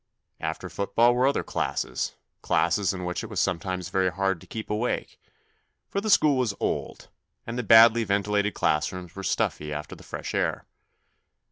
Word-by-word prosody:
After 80 +3 -4
football 100 +6 +2
were 125 +2 +3
other 140 - +1
classes, - - -2 0.3
classes 90 +3 +1
in 90 -2 -5
which 90 0 -3
it - - -7
was - - -3
sometimes 90 0 -1
very 95 0 +2
hard 95 -2 -1
to - - -15
keep 110 -1 -6
awake, 110 +4 -2 0.7
for 200 - -1
the 215 - -2
school 150 -8 +5
was 120 -6 0
old, - - -3 0.4
and 115 - -5
the 125 - -1
badly 115 +1 +7
ventilated 100 0 0
class 75 +2 +1
rooms 90 -2 -9
were 100 - -6
stuffy 75 -4 -1
after 75 0 -5
the - - -15
fresh - - -6
air. - - -1
100 Hz, 170 wpm, -26 LUFS, 90-115 Hz, 0.7 s, badly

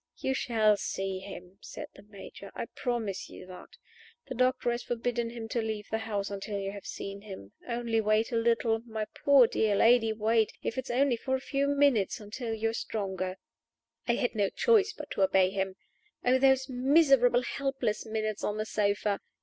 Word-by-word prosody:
"You 265 - -1
shall 220 -5 +2
see 195 -1 -3
him," 190 -1 -10
said - - -8
the - - -15
Major. 200 -1 -11
"I - - -3
promise 230 -6 -3
you - - -11
that. 185 0 -12 0.5
The - - -6
doctor 255 0 +1
has 240 +1 -2
forbidden 240 0 -2
him 230 -1 -7
to 235 - 0
leave 220 -1 -4
the 220 - 0
house 205 -3 -3
until 200 +1 -4
you 195 0 -3
have 200 -1 -9
seen 200 0 -6
him. 190 - -10 0.2
Only 235 -2 0
wait 215 +3 +1
a - - -1
little! 230 0 +2
My 220 -2 -5
poor, 275 +2 +5
dear 220 -2 +1
lady, 225 +1 +5
wait, 220 0 +1
if - - -2
it 260 - -4
is - - -10
only 255 0 +2
for 260 +3 -1
a - - -2
few 275 +1 -1
minutes, 280 -7 +2
until 225 +3 -6
you 225 0 0
are - - -9
stronger." 190 -4 -3 0.7
I 235 - +3
had 245 - -1
no 205 -3 +1
choice 440 -3 +3
but - - -10
to - - -2
obey 190 -1 +4
him. 190 -1 -2 0.5
Oh, 255 +1 +4
those 265 -1 +4
miserable, 260 -2 +4
helpless 265 -6 -2
minutes 215 -1 -3
on 210 - -1
the 215 - -2
sofa! 205 -1 0
225 Hz, 190 wpm, -29 LUFS, 205-245 Hz, 0.7 s, poor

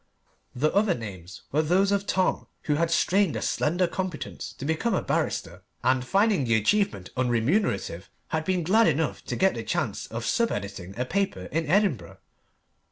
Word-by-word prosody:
The 150 +5 +1
other 200 -3 +3
names 95 -6 -9
were 150 - +3
those 185 +5 +2
of 200 0 0
Tom, 185 -1 +1 0.2
who 150 - +1
had 165 +3 +1
strained 180 +1 +2
a - - -2
slender 175 +4 +1
competence 180 -2 -4
to 135 - -8
become 160 +10 0
a - - -1
barrister, - - -2 0.2
and 130 0 +2
finding 195 - +2
the 115 -2 +2
achievement 110 - +1
unremunerative, 120 - 0 0.2
had 160 0 -1
been 180 +1 0
glad 220 +7 +4
enough - - 0
to - - -3
get - - +3
the - - -5
chance - - -2
of - - -5
sub 235 -1 +1
editing 100 -1 -5
a 125 - 0
paper 195 - -1
in 160 +2 -1
Edinburgh. 160 - +1
160 Hz, 170 wpm, -26 LUFS, 120-195 Hz, 0.2 s, glad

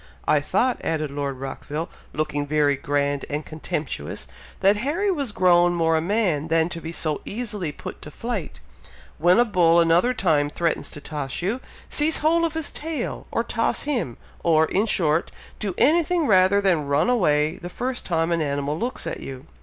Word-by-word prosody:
"I - - +4
thought," 255 -1 +1
added 155 -3 -1
Lord 140 -2 -3
Rockville, 145 +4 -5 0.2
looking 145 -1 -2
very 145 -1 +2
grand 140 0 -1
and 150 +1 -3
contemptuous, 150 - -4 0.3
"that 200 +2 +4
Harry 325 - 0
was 280 - -2
grown 175 -2 +4
more 165 -1 +2
a 160 - +2
man 175 -5 0
than 165 +1 +2
to 170 -1 -6
be 160 - -5
so 155 -3 -2
easily 210 -7 -3
put - - -9
to - - -9
flight. 210 - -5 0.6
When 175 +3 +5
a 240 - +5
bull, 170 -6 +4
another 170 +9 +3
time, 155 -9 +2
threatens 165 +2 -1
to 150 - -10
toss 145 0 -4
you, 225 +8 -1 0.3
seize 305 +2 +2
hold 335 +2 +3
of 325 -1 -3
his 320 -2 -2
tail, 305 -4 -4
or 230 - 0
toss 230 -1 -1
him! 245 - -2 0.3
or, 160 -2 +4
in 200 +7 +1
short, 165 -5 +2 0.3
do 200 -4 -3
anything 335 +2 +3
rather 190 -2 +4
than 170 -7 +2
run 145 +6 +2
away 155 -11 +2
the 175 - -7
first 250 +6 -3
time 165 -1 0
an 170 -1 +1
animal 145 +1 -1
looks 245 +2 -3
at - - -4
you. 135 +1 -8
170 Hz, 180 wpm, -24 LUFS, 150-230 Hz, 0.6 s, When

